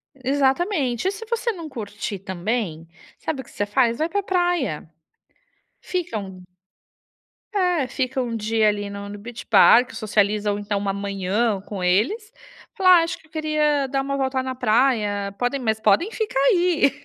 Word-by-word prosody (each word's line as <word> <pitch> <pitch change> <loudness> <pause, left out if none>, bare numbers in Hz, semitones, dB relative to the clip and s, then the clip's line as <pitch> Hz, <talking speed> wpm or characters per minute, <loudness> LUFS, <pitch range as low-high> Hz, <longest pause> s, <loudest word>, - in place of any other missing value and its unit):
Exatamente. 270 - 0
E - - +2
se 405 +3 -8
você 470 +1 -1
não 335 -6 -8
curtir 210 -5 -5
também, 185 -2 -3 0.3
sabe 310 -4 -3
o - - -9
que - - -18
você 205 - -2
faz? 235 +3 +1
Vai 315 - 0
para 405 +3 -1
praia. 350 - -1 0.9
Fica 350 -11 -3
um 190 -3 -8 1.1
É, 360 -8 +1
fica 260 0 -2
um 235 -2 -3
dia 220 0 +1
ali 205 -1 -1
no 200 0 -7
no 205 - -7
Beach 235 +3 -9
Park, 245 +2 +6
socializam 210 -2 +1
então 205 0 -2
uma 200 0 -2
manhã 200 +2 -1
com 195 -1 -6
eles, 285 - +1 0.4
falar: 370 -5 +6
"Ah, - - +2
acho 335 +1 -4
que - - -23
eu - - -29
queria 305 -2 +1
dar 270 +1 0
uma 275 +1 -2
volta 265 -1 0
na 260 0 -4
praia, 215 -5 +1
podem 245 +3 -1
mas 220 -3 0
podem 220 - +3
ficar 430 -12 -2
aí". 345 -5 +3
245 Hz, 170 wpm, -23 LUFS, 205-310 Hz, 1.1 s, Park